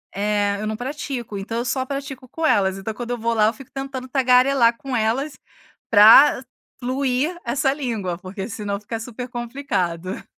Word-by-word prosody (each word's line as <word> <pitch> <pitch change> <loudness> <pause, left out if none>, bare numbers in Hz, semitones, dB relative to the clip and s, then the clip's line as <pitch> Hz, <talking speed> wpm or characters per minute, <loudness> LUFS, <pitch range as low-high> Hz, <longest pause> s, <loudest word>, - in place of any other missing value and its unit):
é, 205 0 0
eu 215 - -3
não 215 - -2
pratico, 250 -4 -5
então 225 +4 -4
eu 240 - -2
só 260 +2 0
pratico 270 -2 -6
com 325 +5 -3
elas. 195 -9 +2
Então 195 +3 -5
quando 240 +2 -7
eu 245 - -1
vou 230 0 -1
lá 215 -2 +4
eu 220 - +1
fico 270 -1 -14
tentando 270 -1 -5
tagarelar 250 -2 +4
com 270 0 -5
elas 245 +6 -1 0.5
pra 225 +6 +8 0.4
fluir 260 +5 -1
essa 270 +3 +1
língua, 225 - -3
porque 190 +1 -6
senão 200 -1 -4
fica 225 +2 -5
super 245 +2 -7
complicado. 230 - -3
240 Hz, 175 wpm, -22 LUFS, 210-270 Hz, 0.5 s, pra